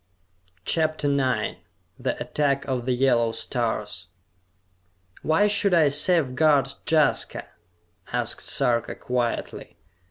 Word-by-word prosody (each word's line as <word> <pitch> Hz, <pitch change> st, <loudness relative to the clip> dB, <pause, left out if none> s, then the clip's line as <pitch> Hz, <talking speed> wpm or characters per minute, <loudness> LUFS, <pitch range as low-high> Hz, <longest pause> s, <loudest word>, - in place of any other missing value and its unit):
CHAPTER 155 Hz, -2 st, +1 dB
IX 130 Hz, -3 st, 0 dB, 0.4 s
The -, -, -2 dB
Attack 140 Hz, -2 st, 0 dB
of 125 Hz, -2 st, -3 dB
the -, -, +2 dB
Yellow 120 Hz, -3 st, +2 dB
Stars 110 Hz, -6 st, -3 dB, 1.1 s
"Why 160 Hz, +6 st, +3 dB
should 200 Hz, -2 st, +3 dB
I 155 Hz, -4 st, +5 dB
safeguard 145 Hz, -2 st, +2 dB
Jaska?" 155 Hz, -1 st, +1 dB, 0.7 s
asked -, -, -1 dB
Sarka 115 Hz, -1 st, 0 dB
quietly. 125 Hz, -2 st, -3 dB
135 Hz, 95 wpm, -24 LUFS, 120-155 Hz, 1.1 s, I